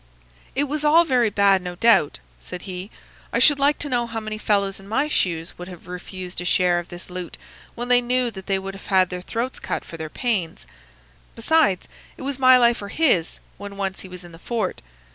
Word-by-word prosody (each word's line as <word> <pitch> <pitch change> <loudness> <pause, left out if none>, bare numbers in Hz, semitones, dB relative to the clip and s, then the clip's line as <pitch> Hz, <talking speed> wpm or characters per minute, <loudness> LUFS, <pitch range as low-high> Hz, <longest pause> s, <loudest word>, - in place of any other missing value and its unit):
"It 280 - +2
was 295 +1 -3
all 320 +3 +6
very 250 -6 +3
bad, 200 -2 +4
no 180 -1 -6
doubt," 205 -7 +4 0.2
said 115 - -8
he. 185 +1 -6 0.4
"I - - 0
should 290 -2 +5
like 285 +1 +3
to 290 - -3
know 240 -3 0
how 225 -1 -4
many 215 -1 -5
fellows 200 -2 0
in 195 - -14
my 225 +8 +1
shoes 170 - -1
would 180 - -7
have 180 -3 -11
refused 180 0 -6
a - - -4
share 180 -1 +2
of 175 - -8
this 175 +1 -10
loot 180 -1 -6 0.4
when 240 +1 -4
they 245 0 +5
knew 245 0 0
that 190 -2 -10
they 195 -1 +1
would 195 0 -6
have 190 -2 +2
their 180 -1 -5
throats 235 +7 -3
cut - - -4
for 165 - -9
their 160 -1 -5
pains. 195 - -2 0.7
Besides, 235 - +2 0.3
it - - -9
was 275 0 -3
my 255 -1 +7
life 235 -2 +3
or 200 - -6
his 200 - +1 0.2
when 200 0 -8
once 195 -1 -3
he - - -9
was 180 0 -10
in 175 - -12
the 165 - -13
fort. 235 +4 -3
200 Hz, 220 wpm, -23 LUFS, 180-245 Hz, 0.7 s, my